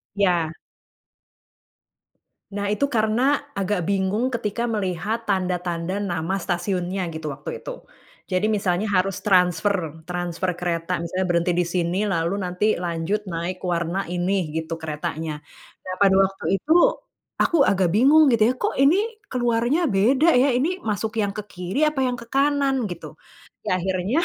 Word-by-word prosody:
Ya. 180 -5 +2 2.1
Nah 205 0 -1
itu 280 +7 +1
karena 250 +4 +1
agak 195 -2 -1
bingung 200 +6 0
ketika 235 0 -2
melihat 210 +1 -2
tanda-tanda 180 0 -1
nama 175 -2 -2
stasiunnya 185 +1 -2
gitu 160 -1 -5
waktu 140 +1 -6
itu, - - -8 0.4
jadi 185 +3 0
misalnya 200 -1 0
harus 195 -1 +1
transfer 180 -3 +1
transfer 175 0 -2
kereta 175 0 -2
misalnya 175 +3 -2
berhenti 170 0 +2
di 175 +1 +1
sini 175 0 -1
lalu 180 +2 0
nanti 180 +4 +1
lanjut 180 +4 -2
naik 175 +2 -4
warna 175 +1 -2
ini 180 0 0
gitu 160 0 -4
keretanya, 155 0 -4 0.4
nah 185 0 -4
pada 195 -1 +5
waktu 195 0 -5
itu, 300 - -1 0.6
aku 340 - +2
agak 190 -2 +2
bingung 275 - +6
gitu 230 -2 +3
ya, - - +3
"Kok - - -1
ini 280 +6 +5 0.3
keluarnya 240 +6 +1
beda 260 +7 +3
ya? 255 +3 +4
Ini 345 +9 0
masuk 215 - -2
yang 200 -1 -2
ke 210 - -4
kiri 180 +11 -1
apa 305 -3 0
yang 250 -1 +1
ke 235 - -10
kanan?" 275 -3 +2
Gitu, 175 -2 -8 0.6
ya 185 - +2
akhirnya 190 - 0
190 Hz, 145 wpm, -23 LUFS, 175-225 Hz, 2.1 s, bingung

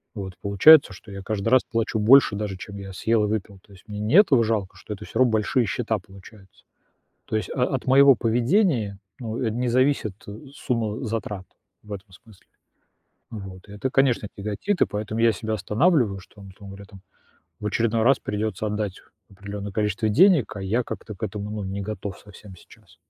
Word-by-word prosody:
Вот 95 -2 -6
получается, 110 +9 +6
что 100 +3 -14
я 100 0 -7
каждый 105 0 -3
раз 130 +1 +5
плачу 115 -1 -2
больше 120 0 +6
даже, 100 -2 -4
чем 100 +2 -9
я 100 -1 -8
съел 110 +3 +1
и - - -1
выпил. 100 -2 -4
То 100 - -23
есть 95 +2 -18
мне 105 -1 -6
не 105 +9 0
этого 140 - +6
жалко, 105 -4 -2
что 100 +2 -7
это 95 - -9
всё 115 - -5
равно 130 -3 +4
большие 110 +3 +1
счета 110 +2 -1
получаются. 95 +1 -17 0.6
То - - -2
есть, 110 - -3
а, 125 - +1
от 130 0 -3
моего 135 +1 +7
поведения, 120 - +1 0.2
ну, 115 -1 -5
э, 115 - 0
не 120 +3 -2
зависит 130 -4 +1 0.4
сумма 115 -5 -2
затрат 105 -3 -4 0.4
в 105 - -11
этом 100 0 -8
смысле, 95 +2 -19 0.9
вот. 95 -3 -9
Это, 105 +6 -3
конечно, 130 -6 +2
тяготит, 105 - -3
и - - +7
поэтому 105 +2 -4
я 115 - +5
себя 110 +2 -4
останавливаю, 110 - +1
что, 90 - -19
там, 100 -2 -12
условно 100 +1 -12
говоря, 100 0 -12
там 95 0 -15 0.6
в 105 - -8
очередной 115 +2 0
раз 135 +4 +4
придется 110 +1 -3
отдать 105 -2 -3 0.3
определенное 100 +1 -7
количество 105 +1 -1
денег, 165 - +4
а 100 - -6
я 110 +6 0
как-то 105 -2 -7
к - - -11
этому, 105 +1 -4
ну, 105 -1 -4
не 95 +1 -4
готов 100 -1 -6
совсем 105 -1 -14
сейчас. - - -20
105 Hz, 190 wpm, -24 LUFS, 100-115 Hz, 0.9 s, моего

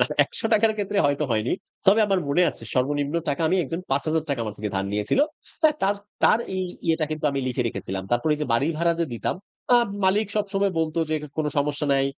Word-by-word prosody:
না - - +4 0.2
৳১00'র 225 -1 +1
ক্ষেত্রে 205 0 -1
হয়তো 145 +1 +1
হয়নি। 110 +1 +1 0.3
তবে 200 +4 +6
আমার 195 -2 +2
মনে 175 +6 +3
আছে, - - -10
সর্বনিম্ন 145 +3 0
টাকা 145 +3 0
আমি, 185 - +2
একজন 165 +5 -4
৳5,000 145 0 0
আমার 105 -2 -5
থেকে 105 0 -2
ধার 95 - 0
নিয়েছিল। 105 - +1 0.4
তাই 310 -1 +6
তার, 195 +1 +3 0.3
তার 220 - +5 0.2
এই 185 - -1 0.2
ইয়েটা 165 -1 +2
কিন্তু 155 0 -4
আমি 140 -1 -2
লিখে 125 0 -1
রেখেছিলাম। 95 -4 -4
তারপর 120 +5 +1
এই 150 - -7
যে - - -1
বাড়ি 135 +6 +2
ভাড়া 170 0 +3
যে - - +3
দিতাম, 115 - -2 0.4
আ - - +8 0.3
মালিক 205 +3 +3
সবসময় 200 -1 0
বলত 160 0 -1
যে, - - +2 0.2
"কোনো 150 - +1
সমস্যা 145 +1 0
নাই। 135 0 +3
155 Hz, 205 wpm, -24 LUFS, 135-190 Hz, 0.4 s, আ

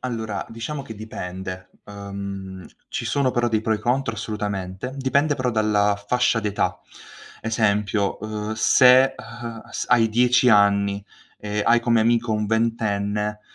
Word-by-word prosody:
Allora, 110 -5 -4
diciamo 125 +6 -5
che 115 - -9
dipende. 95 -3 -7 0.2
Uhm, 100 -2 -7 0.2
ci - - -4
sono 140 -2 +1
però 120 -1 0
dei 110 -1 +1
pro 110 - 0
e - - -3
contro 120 +1 -1
assolutamente, 105 0 -4
dipende 140 +3 +1
però 130 -3 -1
dalla 105 -2 +2
fascia 125 -1 +2
d'età. 105 -2 -1 0.6
Esempio, 105 -2 0
uhm, 105 0 -4
se, 130 +3 +5
uhm, 115 0 -8
s - - -4
hai 115 -2 +4
10 125 +2 +3
anni 100 -1 +3 0.3
e 105 0 -3
hai 120 0 +4
come 115 -1 +2
amico 115 0 +2
un 105 0 -1
ventenne, 105 -2 -1
110 Hz, 140 wpm, -23 LUFS, 100-120 Hz, 0.6 s, se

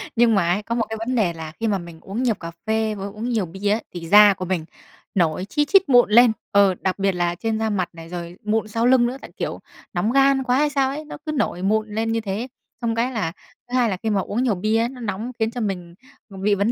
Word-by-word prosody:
Nhưng 230 -1 +4
mà 175 -4 +2
ấy, 200 +4 0
có 230 +2 -3
một 230 -2 0
cái 220 - -4
vấn 230 +3 -2
đề 200 -8 +2
là 160 -1 -7
khi 225 - 0
mà 205 -2 +1
mình 170 -2 -10
uống 210 +6 -4
nhiều 235 -4 +2
cà 165 -3 -8 0.2
phê 220 0 0
với 195 -1 -5
uống 215 +4 -5
nhiều 225 -5 0
bia 190 +4 -3
á, 215 - +2
thì 175 - -5
da 205 +2 +8
của 185 -1 -5
mình 175 -3 -2 0.5
nổi 175 0 +1
chi 295 -1 +1
chít 385 0 +4
mụn 245 -4 +6
lên, 235 +2 +7 0.2
ờ, 200 -2 +4
đặc 190 +1 -1
biệt 195 0 +2
là 175 -1 -1
trên 220 +4 -2
da 220 0 0
mặt 190 -4 -1
này 165 0 -11
rồi 175 0 -6
mụn 215 +1 0
sau 230 +2 -1
lưng 250 -1 +5
nữa, 255 +2 -4
tại, - - -11
kiểu, - - -3 0.3
nóng 180 +6 0
gan 275 0 +4
quá 250 0 +2
hay 295 +1 +3
sao 275 -2 +1
ấy, 300 +3 -5
nó - - -8
cứ 310 - -2
nổi 275 -11 -1
mụn 215 +3 +1
lên 225 +1 0
như 225 0 0
thế. 210 +3 -3 0.3
Xong 230 -1 0
cái 240 +3 0
là, 215 -10 -2 0.4
thứ 245 - -4
hai 240 -2 +3
là 190 - -2
khi 220 - 0
mà 200 -2 +1
uống 215 +6 -2
nhiều 235 -6 +2
bia 215 +4 +1
á, 230 +1 +2
nó 250 0 -10
nóng 220 +2 -4
khiến 220 0 +1
cho 245 - -5
mình 180 -5 -4 0.3
b 195 - -12
bị 205 0 +3
vấn 200 +3 +1
215 Hz, 280 wpm, -22 LUFS, 190-240 Hz, 0.5 s, da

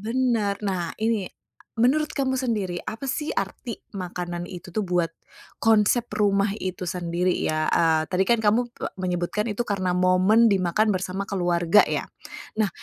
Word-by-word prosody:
Bener. 225 -3 0
Nah, 180 -4 -2
ini 220 -4 0 0.4
menurut 280 +7 +2
kamu 265 -2 0
sendiri, 210 -9 -2
apa 245 +5 -5
sih 300 +3 -2
arti 235 -4 -4 0.2
makanan 175 -1 -4
itu 180 0 -9
tuh 200 +4 -2
buat 175 -2 +1 0.5
konsep 225 +2 +3
rumah 200 -1 +2
itu 185 0 -4
sendiri 175 +1 -1
ya, 155 -2 0
eee, 160 -1 +3
tadi 190 +1 +1
kan 230 -2 +2
kamu 235 +4 +3 0.3
menyebutkan 180 +4 -1
itu 225 +3 -2
karena 185 -4 -1
momen 185 +5 +4
dimakan 195 +3 +2
bersama 190 +1 -3
keluarga, 175 0 +3
ya. - - -1 0.6
Nah, 210 - +3
195 Hz, 145 wpm, -24 LUFS, 180-225 Hz, 0.6 s, momen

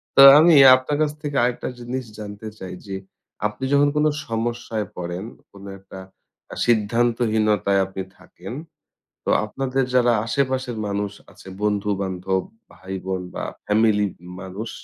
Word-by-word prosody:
তা 135 - +9 0.2
আমি 165 +1 +6 0.2
আপনার 130 +3 -2
কাছ 150 - +2
থেকে 145 -2 -3
আরেকটা 125 0 -1
জিনিস 125 +2 -4
জানতে 105 +1 -8
চাই। 95 -1 -7
যে, 95 - -4 0.5
আপনি 105 +4 -10
যখন 145 0 +5
কোনো 150 +1 +3 0.2
সমস্যায় 115 -2 -3
পড়েন, 90 +2 -5 0.3
কোনো 100 0 -12
একটা 95 0 -12 0.5
আ - - -7
সিদ্ধান্তহীনতায় 110 -3 +2
আপনি 95 0 -6 0.2
থাকেন, 95 +3 -11 0.7
তো - - -1 0.2
আপনাদের 135 +4 -1
যারা 120 -1 +4
আশেপাশের 130 0 -1
মানুষ 100 0 -2 0.2
আছে, - - -16 0.2
বন্ধু-বান্ধব, 95 -2 -1 0.3
ভাই-বোন 95 0 -5
বা - - -4 0.2
ফ্যামিলির 105 -2 +2 0.3
মানুষ, 95 +4 -6
105 Hz, 130 wpm, -22 LUFS, 95-120 Hz, 0.7 s, তা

